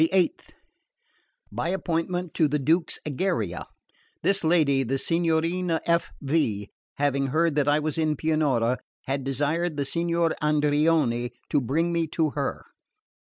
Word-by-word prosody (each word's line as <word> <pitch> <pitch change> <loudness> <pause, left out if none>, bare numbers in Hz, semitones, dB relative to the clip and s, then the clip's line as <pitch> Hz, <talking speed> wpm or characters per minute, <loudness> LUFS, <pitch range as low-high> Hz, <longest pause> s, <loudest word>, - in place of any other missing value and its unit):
The 160 - +4
8th. 185 -3 +1 1.0
By 120 +8 -2
appointment, 175 -1 -2
to 160 - +3
the 150 +1 0
Duke's 160 +5 +1
Egeria. 155 +6 -2 0.6
This 195 -1 +2
lady, 155 -5 +3
the 135 +1 -1
Signorina 165 +2 0
F.V., 145 -10 0 0.2
having 140 -1 +1
heard 160 +4 +2
that 145 -1 +1
I 145 0 +4
was 155 +1 -2
in 155 -1 +1
Pianura, 135 -6 +1 0.3
had 135 0 -2
desired 150 +5 -1
the 140 - 0
Signor 170 +1 0
Andreoni 150 -5 +2 0.2
to 145 - +3
bring 165 +7 0
me 165 -1 0
to 160 -3 +2
her. 140 -1 -3
155 Hz, 135 wpm, -26 LUFS, 140-170 Hz, 1.0 s, The